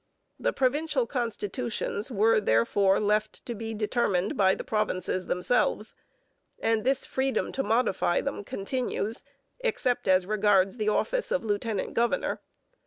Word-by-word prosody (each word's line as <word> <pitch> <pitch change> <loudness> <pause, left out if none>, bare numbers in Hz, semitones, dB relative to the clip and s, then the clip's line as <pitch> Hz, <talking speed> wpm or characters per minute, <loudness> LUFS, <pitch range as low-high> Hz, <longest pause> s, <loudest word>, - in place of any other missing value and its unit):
The - - +1
provincial 300 - +1
constitutions 235 - -3
were, 220 -1 +3
therefore, 190 - +3
left 210 +1 0
to 240 - -4
be 225 0 -5
determined 210 -3 0
by 190 -2 +4
the - - -6
provinces 185 -4 -1
themselves, 215 +3 0 0.6
and 225 -1 +1
this 270 +2 +1
freedom 265 0 -1
to 270 - -1
modify 225 -8 +1
them 280 -6 -3
continues, 220 +1 -3 0.4
'except 435 - 0
as 185 -1 +4
regards 205 0 +2
the 215 -1 +1
office - - 0
of 250 - 0
lieutenant 205 -1 -2
governor.' 235 +1 0
215 Hz, 130 wpm, -27 LUFS, 200-245 Hz, 0.6 s, by